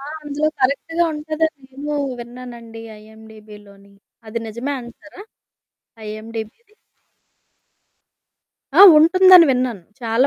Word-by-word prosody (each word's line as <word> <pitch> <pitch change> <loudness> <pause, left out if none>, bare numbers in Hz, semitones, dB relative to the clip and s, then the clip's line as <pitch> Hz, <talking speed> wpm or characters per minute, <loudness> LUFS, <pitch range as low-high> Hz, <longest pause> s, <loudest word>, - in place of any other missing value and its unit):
ఆ! - - -12 0.2
అందులో 295 +1 -2
కరెక్ట్‌గా 285 +6 0
ఉంటదన్ని 310 -1 -3
నేను 295 +2 -5 0.2
విన్నానండి 235 -2 -11 0.2
ఐఎండీబిలోని. 210 -2 -16 0.4
అది 230 +2 -4
నిజమే 240 +6 -5
అంటారా? 275 - -14 0.9
ఐఎండీబీ‌ది. 225 - -9 2.0
ఆ! - - +8 0.2
ఉంటుందని 365 +2 +6
విన్నాను. 250 -6 -2 0.2
చాలా 230 +2 +1
250 Hz, 90 wpm, -19 LUFS, 220-300 Hz, 2.0 s, ఆ